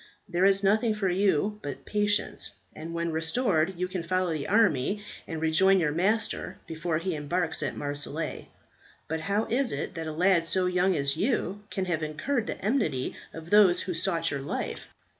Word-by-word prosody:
There 180 -1 +1
is 195 0 +5
nothing 215 +3 +3
for 200 -3 0
you 195 +2 +1
but 145 -2 -7
patience, 205 0 0 0.2
and 160 +2 -7
when 170 0 -2
restored 165 +1 +1
you 180 +1 -1
can 185 -1 -4
follow 185 0 0
the 150 -3 -3
army, 205 - +2 0.2
and 165 -2 -4
rejoin 185 +5 +4
your 155 -4 +1
master 205 +7 0
before 165 0 -2
he 180 +3 -2
embarks 160 +3 -1
at - - -3
Marseilles. 145 +2 -3 0.6
But 160 +1 -2
how 200 +7 0
is 250 0 +1
it - - -4
that 165 -2 -5
a - - -3
lad 175 +2 +3
so 180 +3 +3
young 180 +1 +2
as 140 0 0
you 205 -1 -1
can 190 -2 -2
have 170 -3 -1
incurred 155 - -2
the - - -4
enmity 200 - 0 0.2
of 165 +1 -10
those 205 -4 +6
who 185 - -3
sought 165 -1 0
your 140 -1 -3
life? 135 - -4
180 Hz, 180 wpm, -28 LUFS, 160-200 Hz, 0.6 s, those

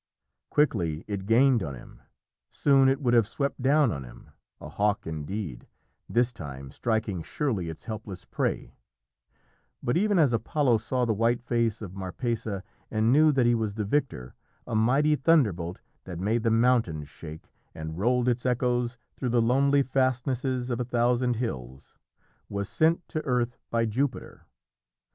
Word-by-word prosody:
Quickly 90 - +1
it 100 -2 -4
gained 125 +1 +4
on 70 -6 -4
him - - -14 0.5
soon 135 -2 +4
it 135 - +1
would 120 -3 +2
have 115 -4 +4
swept 140 +3 -3
down 140 0 +4
on 70 -3 -4
him - - -14 0.3
a - - -8
hawk 105 0 0
indeed, 80 - -5 0.4
this 120 +1 +2
time, 70 - -8
striking 110 -6 -1
surely 105 - -2
its 80 - -9
helpless 105 -5 -7
prey - - -2 1.1
but 120 - 0
even 205 +1 +2
as 145 -7 +4
Apollo 120 +1 +2
saw 125 +3 -1
the 115 - +1
white 115 +3 +1
face 115 -2 0
of 95 -3 -7
Marpessa 100 +1 -3 0.3
and 110 +2 +2
knew 155 +2 +6
that 135 -4 +2
he 120 - +4
was 110 -3 -1
the 105 -1 -2
victor, 100 - -1 0.3
a 120 - -6
mighty 135 +8 +3
thunderbolt 105 - +2 0.2
that 90 -3 -6
made 110 +6 0
the 115 - +1
mountains 115 - +2
shake, 75 +3 -11 0.2
and 80 +1 -6
rolled 125 +3 +2
its 125 0 +1
echoes 125 -1 0 0.2
through 130 - -2
the 120 0 +3
lonely 140 +4 +3
fastnesses 130 -1 0
of 120 - -1
a - - +1
thousand 120 +1 +1
hills, 65 - -5 0.6
was 100 -1 -3
sent 165 +7 +1
to 155 - -3
earth 125 -2 0
by 115 0 +1
Jupiter. 125 +5 -3
115 Hz, 155 wpm, -27 LUFS, 100-130 Hz, 1.1 s, knew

